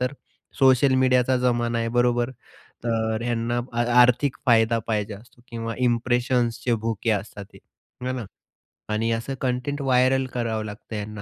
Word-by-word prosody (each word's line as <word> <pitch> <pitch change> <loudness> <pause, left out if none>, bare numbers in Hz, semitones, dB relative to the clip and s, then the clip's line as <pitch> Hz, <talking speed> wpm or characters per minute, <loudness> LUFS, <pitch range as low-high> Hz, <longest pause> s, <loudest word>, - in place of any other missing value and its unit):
तर 125 +2 -1 0.5
सोशल 130 0 +5
मीडियाचा 130 0 +3
जमाना 120 -1 0
आहे 115 - -1
बरोबर? 120 0 +2 0.5
तर 110 -1 -1
ह्यांना 120 0 -1 0.4
आर्थिक 125 +3 +3
फायदा 115 -1 +4
पाहिजे 105 -1 -1
असतो. 120 +3 -18
किंवा 115 -1 -4
इंप्रेशन्सचे 120 0 +1
भुके 115 0 -1
असतात 100 -1 -4
हे, - - -14 0.5
है - - 0
ना. 125 -4 -4 0.7
आणि 115 +2 0
असं 115 +4 -2
कंटेंट 130 +3 -2
व्हायरल 130 0 +3
करावं 110 -3 -2
लागतं 105 +1 -8
यांना 105 0 -6
120 Hz, 140 wpm, -24 LUFS, 115-125 Hz, 0.7 s, सोशल